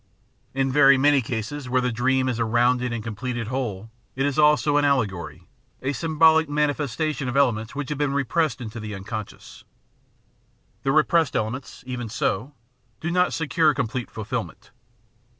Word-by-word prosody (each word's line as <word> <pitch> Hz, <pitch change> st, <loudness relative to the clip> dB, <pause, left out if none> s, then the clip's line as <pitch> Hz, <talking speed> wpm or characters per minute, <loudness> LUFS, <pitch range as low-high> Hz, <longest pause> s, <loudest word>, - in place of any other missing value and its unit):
In 135 Hz, -1 st, +1 dB
very 140 Hz, -1 st, +6 dB
many 145 Hz, +1 st, +4 dB
cases 125 Hz, +4 st, -5 dB
where 130 Hz, +1 st, +2 dB
the 125 Hz, 0 st, 0 dB
dream 130 Hz, +3 st, +1 dB
is 120 Hz, -2 st, -1 dB
a -, -, +2 dB
rounded 120 Hz, +2 st, +2 dB
and 115 Hz, -2 st, -4 dB
com 115 Hz, -1 st, -5 dB
pleted 120 Hz, 0 st, -4 dB
whole 115 Hz, -5 st, -4 dB, 0.2 s
it 135 Hz, +1 st, 0 dB
is 145 Hz, +1 st, 0 dB
also 150 Hz, -1 st, +4 dB
an 145 Hz, -, +3 dB
aUegory, 95 Hz, -, -1 dB, 0.4 s
a 135 Hz, +2 st, 0 dB
symbolic 160 Hz, +1 st, +3 dB
manifestation 145 Hz, -1 st, -1 dB
of 130 Hz, -, -2 dB
elements 115 Hz, -4 st, +1 dB
which 145 Hz, -2 st, -4 dB
have 150 Hz, -1 st, -3 dB
been 145 Hz, -2 st, +1 dB
repressed 140 Hz, -2 st, 0 dB
into 115 Hz, 0 st, -6 dB
the 105 Hz, -1 st, -6 dB
unconscious. 105 Hz, +2 st, -8 dB, 1.2 s
The 135 Hz, -, 0 dB
repressed 155 Hz, +1 st, +3 dB
elements, 120 Hz, +5 st, -4 dB
even 125 Hz, -3 st, -5 dB
so, 115 Hz, +5 st, -2 dB, 0.4 s
do 170 Hz, -, -3 dB
not 180 Hz, +1 st, +2 dB
secure 160 Hz, -1 st, +2 dB
complete 125 Hz, -2 st, -3 dB
fulfilment. 115 Hz, +2 st, -6 dB
130 Hz, 160 wpm, -24 LUFS, 115-145 Hz, 1.2 s, very